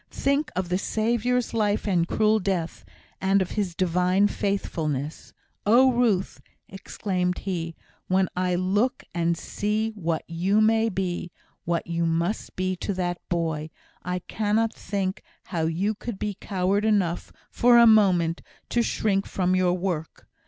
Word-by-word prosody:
think 280 +2 0
of 180 -1 -2
the 180 +1 +1
Saviour's 235 +4 0
life 210 -2 0
and 175 -4 +2
cruel 215 +2 +2
death, 180 -4 -2 0.4
and 195 +1 +3
of 185 -2 -2
His 195 -5 -2
divine 180 +2 +2
faithfulness. 160 -9 -3 0.3
Oh, 250 +5 +5
Ruth!" 230 -6 +1 0.3
exclaimed 185 -2 -2
he, 170 -4 -4 0.3
"when 185 0 +2
I 180 0 0
look 200 +7 0
and 170 0 0
see 215 +5 -2
what 170 -6 -2
you 180 +5 +1
may 225 +1 +3
be 180 -3 -3 0.3
what 170 0 -1
you 170 0 -1
must 170 +5 -1
be 185 0 -1
to 200 - -3
that 175 -1 -2
boy, 160 -3 -1 0.3
I 180 0 -2
cannot 220 +4 0
think 195 -1 -3 0.2
how 165 -3 -2
you 185 +6 0
could 220 0 -6
be 210 +1 -2
coward 195 0 -1
enough, 200 -6 +1 0.2
for 240 0 +5
a 235 - +8
moment, 185 -7 +4 0.3
to 240 - +2
shrink 200 -3 0
from 185 -1 0
your 180 -1 +2
work! 175 -3 -4
190 Hz, 145 wpm, -25 LUFS, 175-215 Hz, 0.4 s, a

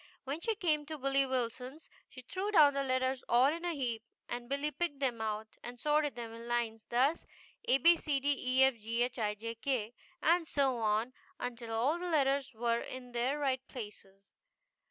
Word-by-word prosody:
When 285 +4 -4
she 450 +2 0
came 305 -7 0
to 310 0 -5
Billy 275 0 +2
Wilson's 255 +4 -3 0.2
she 255 - -11
threw 380 +10 -3
down 305 -8 +6
the 275 - 0
letters 260 0 0
all 255 +5 +5
in 335 +1 -6
a 345 -2 -1
heap, 240 -5 -2 0.3
and 240 0 -5
Billy 280 +2 -1
picked 300 0 -2
them 250 -5 -1
out 215 0 -2 0.2
and 240 0 -8
sorted 295 +1 +1
them 230 -1 -6
in 230 +1 -9
lines, 230 -2 -2
thus: 265 +7 +2 0.4
ABCDEFGHIJK, 275 -3 +3
abed 240 -5 -3
efghij 230 -1 -2
k, 245 -5 -1 0.3
and 335 0 +3
so 270 -4 +1
on 220 +3 +1 0.3
until 240 -2 -5
all 255 +9 +1
the 360 0 -3
letters 275 -4 +2
were 235 +1 +1
in 250 -1 -8
their 245 +4 0
right 265 -3 0
places. 200 -4 -10
260 Hz, 170 wpm, -33 LUFS, 235-290 Hz, 0.4 s, down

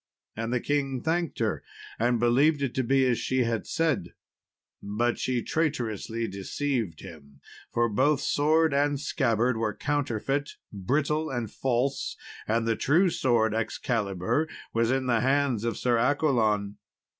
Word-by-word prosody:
And 115 +1 -3
the 125 - +1
king 135 -2 -1
thanked 170 +1 -1
her, 110 -3 -1 0.4
and 120 +1 +2
believed 140 +5 +3
it 130 - -1
to 130 - 0
be 135 +2 +3
as 125 -2 +1
she 130 -1 0 0.2
said; 135 - -1 0.7
but 115 +4 -1
she 125 -2 -1
traitorously 115 - -2
deceived 100 - -3
him, 70 -3 -13 0.3
for 120 0 +2
both 130 +6 +2
sword 155 +1 +2
and 145 0 +1
scabbard 125 -5 +1
were 110 -2 -1
counterfeit, 145 0 -2 0.2
brittle, 150 +10 0
and 120 -5 -3
false, 135 +2 -1 0.3
and 115 +1 +1
the 115 - +2
true 170 - +3
sword 115 -6 +2
Excalibur 110 - -1 0.3
was 115 0 +2
in 130 0 +1
the 120 -2 +2
hands 135 -3 +1
of 115 -1 -1
Sir 120 -2 +1
Accolon. 115 -7 +1
125 Hz, 140 wpm, -27 LUFS, 115-145 Hz, 0.7 s, believed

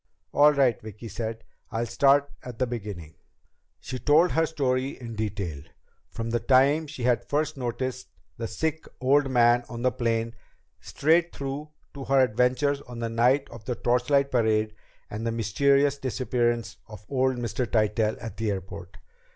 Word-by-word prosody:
"All 150 +1 +6
right," 135 -6 +2
Vicki 110 +1 -9
said. 110 +1 -5 0.3
"I'll 115 +1 -2
start 140 +4 +3
at 125 -2 -9
the 130 - +1
beginning." 100 -10 -6 0.7
She 130 - -6
told 155 +6 +4
her 160 0 +2
story 135 -3 -1
in 115 -2 -7
detail, 100 -8 -3 0.5
from 115 0 -5
the 120 - +1
time 135 +6 +3
she 140 -4 -7
had 120 -1 +2
first 155 +1 0
noticed 130 0 -4 0.3
the 115 - -4
sick 160 +9 -3
old 135 +2 +3
man 120 -1 +4
on 120 0 -6
the 130 - +3
plane 115 -1 -1 0.5
straight 165 +3 +2
through 140 +2 -5 0.2
to 140 -2 -7
her 135 0 +3
adventures 130 +4 +1
on 125 -3 -10
the 115 -1 -3
night 125 +5 +2
of 115 -2 -11
the 125 - -2
torchlight 125 +4 +1
parade 110 -3 +1 0.3
and 105 +2 -6
the 115 - -1
mysterious 140 +6 +2
disappearance 120 -2 -1
of 105 -1 -12
old 130 -1 +1
Mr. 120 +1 -2
Tytell 110 -1 +1
at 115 -3 -8
the 110 -1 -1
airport. 95 0 -6
120 Hz, 160 wpm, -26 LUFS, 115-140 Hz, 0.7 s, All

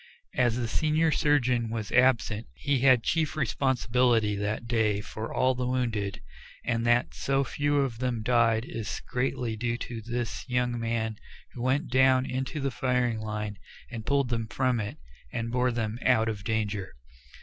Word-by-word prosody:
As 120 -2 +2
the 120 -2 -1
senior 155 +5 +2
surgeon 125 -7 +2
was 110 -2 -4
absent 120 -3 +3
he 140 -2 0
had 130 -2 +5
chief 160 -2 0
responsibility 125 -6 +2
that 105 +3 -2
day 110 -3 +1
for 110 +2 -6
all 130 0 +2
the 125 0 -2
wounded, 115 -6 -1 0.4
and 115 0 0
that 120 +1 +3
so 135 0 0
few 145 +3 -1
of 125 -5 -2
them 125 -3 -1
died 115 -1 +3
is 110 -4 -4
greatly 125 -2 -1
due 120 +1 -1
to 120 -2 -6
this 120 +1 -3
young 125 -1 0
man 115 -1 -1 0.4
who 120 - -7
went 135 +6 +1
down 130 0 +4
into 130 +4 -3
the 135 -1 -1
firing 125 -3 0
line 105 -2 -4 0.3
and 115 -3 -5
pulled 140 -3 +2
them 115 -2 -1
from 125 +1 0
it, 105 -1 -4 0.3
and 115 0 -3
bore 125 0 +2
them 115 -1 -2
out 115 -3 +3
of 105 -2 -5
danger. 105 -3 -2
120 Hz, 165 wpm, -28 LUFS, 110-130 Hz, 0.4 s, had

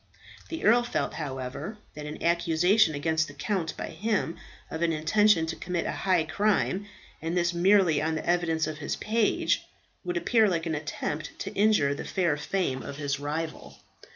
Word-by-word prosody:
The 325 - -4
earl 235 +3 +6
felt, 240 - -2
however, 135 - -5 0.2
that 150 0 -7
an 150 - -7
accusation 170 +2 +3
against 160 +2 +1
the 145 - -11
count 165 +2 -2
by - - -4
him 190 -1 -1 0.4
of 160 - -4
an 170 -1 +2
intention 165 +3 +3
to 160 - -4
commit 180 -2 -3
a - - -1
high 185 -4 +1
crime, 200 +3 0 0.3
and 165 +3 -2
this 175 0 +2
merely 175 -3 +4
on 160 +1 0
the 155 - -4
evidence 170 -2 +1
of 155 -1 -5
his 145 - -2
page, 220 0 +1 0.4
would 175 -1 -2
appear 220 +5 +3
like 165 -2 -1
an 165 - -1
attempt 150 0 -4
to 200 - -5
injure 205 -9 +3
the 140 - -5
fair 175 -6 +1
fame 150 -3 -1
of 140 - -7
his 140 -1 -2
rival. 155 +3 -4
165 Hz, 180 wpm, -28 LUFS, 155-195 Hz, 0.4 s, earl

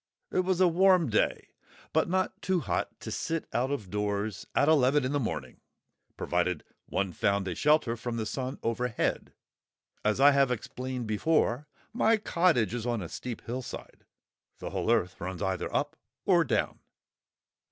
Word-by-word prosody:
It - - +1
was 185 -1 +1
a 185 - +6
warm 180 -4 +4
day, 110 - +1 0.4
but - - +2
not 185 +1 -1
too 185 -2 +1
hot - - -2
to - - -6
sit 165 -1 -2
out 125 +3 +1
of 115 -10 -4
doors 105 0 -2
at 145 - +4
eleven 145 -2 +4
in 130 - -1
the 145 - +1
morning, 80 - -4 0.6
provided 90 -2 0 0.2
one 95 -2 -1
found 100 +3 +1
a 90 - -1
shelter 150 - +2
from 120 0 -4
the 110 - -2
sun 130 +4 -3
overhead. 115 0 -1 0.7
As 105 +3 +1
I 140 +1 +8
have 140 -2 +3
explained 125 +1 -4
before, 125 +4 +1 0.3
my 225 -1 +3
cottage 170 - +2
is 120 -1 -3
on 120 -5 -1
a 80 - -7
steep 120 +4 -6
hillside, 125 +1 -7 0.5
the - - -6
whole - - -2
earth 95 -6 0
runs 90 +1 -4
either 95 -1 -2
up - - -1 0.3
or - - +5
down. - - -1
125 Hz, 165 wpm, -29 LUFS, 105-150 Hz, 0.7 s, I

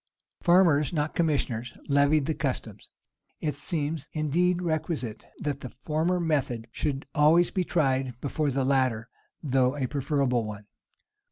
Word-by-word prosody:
Farmers, 170 -6 +4
not 150 -2 -1
commissioners, 130 -7 -1
levied 145 +1 +3
the 160 - 0
customs. 120 -8 -4 0.5
It 150 -3 -2
seems, 150 0 -2
indeed, 170 +4 +1
requisite, 155 - -2
that 145 -2 -3
the 130 - -7
former 155 +8 -1
method 140 -9 -1
should 140 +1 -2
always 160 +3 +4
be 185 - 0
tried 130 -7 0
before 145 +2 -1
the 135 -1 0
latter, 130 -4 +1 0.3
though 130 -1 +2
a 135 - 0
preferable 135 -2 0
one. 105 -1 -7
145 Hz, 135 wpm, -27 LUFS, 130-155 Hz, 0.5 s, Farmers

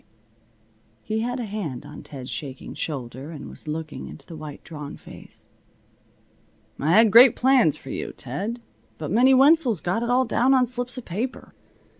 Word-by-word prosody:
He 220 0 -2
had 245 +3 -2
a 240 - -3
hand 195 - -5
on - - -10
Ted's 130 -3 -9
shaking 135 -3 -6
shoulder, 135 -1 -5
and 155 -4 -8
was - - -13
looking 155 0 -5
into 140 - -11
the 165 - -10
white, 150 -2 -9
drawn 150 -3 -8
face. - - -13 1.3
"I 150 +4 +1
had 220 +1 +6
great 240 +3 +9
plans 250 - +4
for - - -10
you, - - -4
Ted. 205 - -5 0.4
But 155 0 -5
Minnie 255 +5 +5
Wenzel's 270 - +5
got 180 +8 -1
it 235 - -2
all 255 +1 +3
down 255 +3 +3
on 255 -1 +4
slips 245 +1 -4
of 255 - -7
paper. 225 +9 -5
215 Hz, 170 wpm, -24 LUFS, 150-245 Hz, 1.3 s, great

